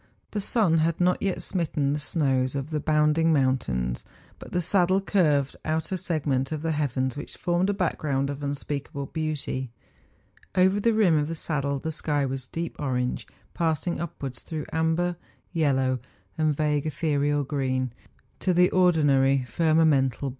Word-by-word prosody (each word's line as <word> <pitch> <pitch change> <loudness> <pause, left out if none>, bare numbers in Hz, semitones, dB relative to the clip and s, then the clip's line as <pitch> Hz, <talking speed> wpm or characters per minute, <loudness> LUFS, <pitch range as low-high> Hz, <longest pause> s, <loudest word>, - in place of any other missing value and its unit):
The 210 - -2
sun 195 -6 +3
had 165 +1 +1
not 180 0 +2
yet 195 -2 -1
smitten 150 -6 0
the 150 - -1
snows 135 -4 0
of 140 +3 -4
the 155 - 0
bounding 155 +2 +3
moun¬ 130 -3 +3
tains; 60 - -3 0.4
but - - -11
the 180 - 0
saddle 185 +1 +3
curved 150 -9 +2
out 160 +1 -2
a 190 - 0
segment 145 -6 -1
of 155 -1 -3
the 165 - 0
heavens 130 -4 -1
which 145 - -6
formed 175 +2 +1
a - - +2
background 145 -7 -1
of 140 +1 -7
unspeakable 140 0 -4
beauty. 150 -4 -3 0.9
Over 190 +2 +4
the 230 +2 +2
rim 180 -8 +4
of 145 - -1
the 165 - -4
saddle 140 -3 -2
the 160 +4 -4
sky 145 -2 -1
was 130 -1 -4
deep 165 +3 -4
orange 125 -3 -2 0.3
passing 165 0 -1
upwards 140 -7 -5
through 155 -2 -5
amber, 160 +2 +1 0.4
yellow, 135 -5 +1 0.4
and 155 -2 +1
vague 150 -1 +1
ethereal 145 -1 0
green 130 -3 -1 0.5
to 185 -2 +1
the 180 +1 +5
ordinary 140 -7 +3
firmamental - - -21
40 120 - -6 0.3
MOUNTAIN 140 -4 +4
ADVENTURES. 140 +4 -4
150 Hz, 170 wpm, -26 LUFS, 135-165 Hz, 0.9 s, the